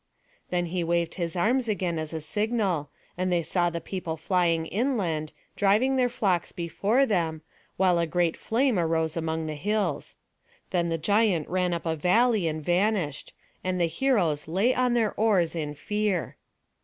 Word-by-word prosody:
Then 175 -1 0
he 180 -2 0
waved 170 0 0
his 170 -2 -3
arms 235 +7 +1
again 185 -6 -1
as 155 -1 -4
a 160 -1 -4
signal, 205 -5 -1 0.3
and 185 0 0
they 175 -1 +2
saw 175 +2 +1
the 170 0 -4
people 170 -3 -5
flying 170 -1 +1
inland, 185 - -1 0.2
driving 215 +7 +3
their 250 -1 +2
flocks 195 -7 0
before 200 +9 +1
them, 165 - -1 0.3
while 180 -2 +3
a 170 - +1
great 170 +1 +1
flame 235 -2 +1
arose 160 -1 0
among 160 -1 -2
the 155 - -3
hills. 195 +1 -2 0.6
Then 170 -2 +1
the 165 - 0
giant 200 -1 +2
ran 180 0 0
up 170 0 -3
a 165 -1 0
valley 205 +4 +3
and 155 -1 -3
vanished; 175 -4 0 0.3
and 185 0 -1
the 170 - +3
heroes 165 - +1
lay 195 +10 +2
on 250 -1 +1
their 225 -3 +1
oars 195 -7 +2
in 150 -2 -3
fear. 210 +1 -1
175 Hz, 170 wpm, -27 LUFS, 165-210 Hz, 0.6 s, driving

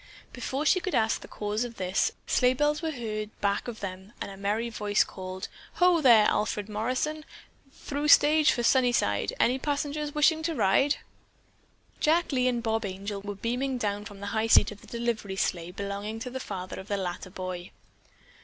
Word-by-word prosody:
Before 265 +3 -3
she 370 - +4
could 370 0 -2
ask 225 0 +2
the - - -10
cause 210 +2 -2
of 240 -1 -6
this, 185 -1 0
sleigh 250 +1 +3
bells 295 +3 +1
were 325 - -1
heard 215 -6 -4
back 200 +3 0
of 235 -3 -6
them 190 +2 -7
and - - -5
a - - -9
merry 205 +4 -1
voice 210 -2 +1
called: 185 0 -7 0.3
"Ho 355 -2 +4
there, 235 -6 +7
Alfred 210 -1 0
Morrison! 255 +8 -2 0.5
Through 285 +2 -4
stage 300 +1 +6
for 240 - -1
Sunnyside! 240 - +2
Any 255 +2 +3
passengers 290 +1 -2
wish 300 0 +6
to 320 0 -2
ride?" 235 +6 +3 1.0
Jack 330 +3 +2
Lee 255 -2 +2
and 240 -2 0
Bob 225 -1 0
Angel 200 +1 -5
were 205 0 -5
beaming 250 +5 -2
down 205 -3 -2
from 200 -1 -10
the 200 - -5
high 220 0 +1
seat 225 - +6
of 205 - -12
a - - -15
delivery 235 -4 -2
sleigh 175 -3 -1
belonging 200 +3 -5
to 250 - -5
the 260 - -4
father 185 -6 -6
of 190 - -9
the 205 -2 -1
latter 185 -1 -4
boy. 185 -1 -6
225 Hz, 185 wpm, -28 LUFS, 200-270 Hz, 1.0 s, there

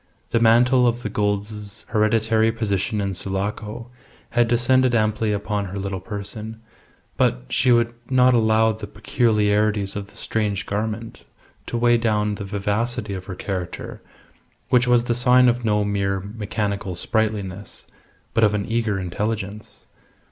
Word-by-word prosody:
The 115 - +3
mantle 125 +2 +5
of 120 +1 -1
the 105 - -2
Goulds' 105 0 -2
hereditary 110 0 +2
position 105 -2 -1
in 100 -1 -1
Sulaco 105 +5 -4 0.4
had 120 0 +3
descended 120 +1 +3
amply 110 0 +1
upon 105 0 -2
her 95 +1 -6
little 95 -1 -3
person; 105 +3 -7 0.6
but - - +1
she 125 - +2
would 120 0 +3 0.2
not 130 -1 +5
allow 110 -1 +3
the 110 -1 -7
peculiarities 105 -2 +1
of 100 -1 -5
the - - -20
strange 105 -3 -2
garment 110 +2 -4 0.5
to 120 - -2
weigh 120 0 +4
down 105 -2 +1
the 100 - -5
vivacity 105 +2 -2
of 95 -1 -6
her 95 - -6
character, 90 -1 -5 0.7
which 125 -1 +4
was 120 -1 +4
the 120 - 0
sign 125 +1 +5
of 120 0 +1
no 105 -2 +2
mere 100 -1 0
mechanical 100 -1 -3
sprightliness, 105 0 -2 0.5
but 115 - +2
of 105 -1 +4
an 100 -1 -1
eager 115 -3 0
intelligence. 105 +3 -4
105 Hz, 145 wpm, -22 LUFS, 100-115 Hz, 0.7 s, mantle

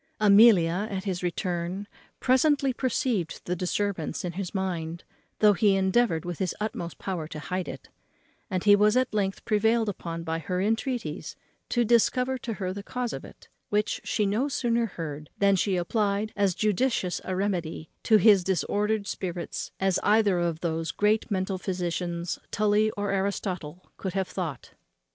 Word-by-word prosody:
Amelia, 200 -3 +6
at 190 -2 -3
his 185 -3 -2
return, 180 +2 -2 0.3
presently 270 +1 +3
perceived 240 - -1
the 180 - -1
disturbance 180 -2 -2
in 175 - -2
his 180 0 -4
mind, 175 -4 -3 0.3
though 210 -1 +6
he 200 0 +3
endeavoured 190 -3 +2
with 175 -2 -5
his 185 -3 -1
utmost 190 -6 -4
power 175 -5 -4
to 155 - -8
hide 180 +5 -3
it; - - -8 0.6
and 185 -3 -1
he 205 -1 +7
was 210 +3 +4
at 255 -2 +1
length 195 -2 -1
prevailed 220 +1 +2
upon 170 -4 -4
by 165 0 -2
her 180 +2 -2
entreaties 225 +5 -2 0.3
to 240 -1 +2
discover 250 +3 +2
to 230 -1 -4
her 185 -3 -3
the 200 - -6
cause 245 +3 -3
of - - -6
it, - - -14 0.2
which 210 0 0
she 210 - 0
no 215 +8 +1
sooner 235 -4 0
heard 155 -5 -6
than 200 -1 +4
she 190 +1 +1
applied 205 +3 0
as 200 -3 +2
judicious 215 -3 0
a 185 - -3
remedy 175 -5 -2
to 220 - +5
his 205 -3 +6
disordered 205 +4 0
spirits 180 -3 -4
as 190 -1 +2
either 205 -3 +3
of 170 -2 -1
those 165 -1 -2
great 210 +1 +1
mental 190 -1 -1
physicians, 175 -2 -3
Tully 210 +1 +2
or 205 -1 -1
Aristotle, 185 -4 -3
could 190 - -4
have 190 -1 -1
thought 165 -9 -5
of. - - -31
195 Hz, 165 wpm, -27 LUFS, 175-215 Hz, 0.6 s, he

